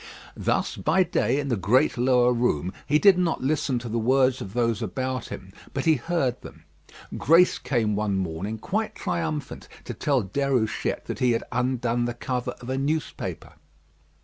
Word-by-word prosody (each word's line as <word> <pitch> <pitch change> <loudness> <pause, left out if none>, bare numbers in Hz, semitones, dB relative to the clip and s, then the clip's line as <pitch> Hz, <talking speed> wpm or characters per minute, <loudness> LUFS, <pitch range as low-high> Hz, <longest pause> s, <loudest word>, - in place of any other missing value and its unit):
Thus - - -1
by 190 - +3
day 135 -6 0
in 140 -1 -3
the 120 - +2
great 115 +9 +2
lower 125 0 +3
room, 95 -8 0
he 150 - +4
did 190 +2 +6
not 170 -7 0
listen 140 -2 0
to 120 0 -5
the 115 +1 -1
words 130 +2 +2
of 95 +3 -8
those 115 -3 +1
about 130 -2 -3
him, - - -9 0.2
but - - -2
he 160 - +6
heard 130 -2 -1
them. 80 - -12 0.5
Grace 170 +4 +4
came 110 -6 0
one 105 -2 0
morning 95 +4 -3
quite 210 - -2
triumphant 155 -4 -3 0.2
to - - -6
tell 135 -5 +1
Déruchette 125 +1 -1
that - - -5
he 125 -2 +3
had 115 - -1
undone 120 -1 0
the 120 0 -3
cover 125 0 -3
of 120 - -9
a 130 - -1
newspaper. 150 +3 -3
125 Hz, 175 wpm, -25 LUFS, 115-145 Hz, 0.5 s, did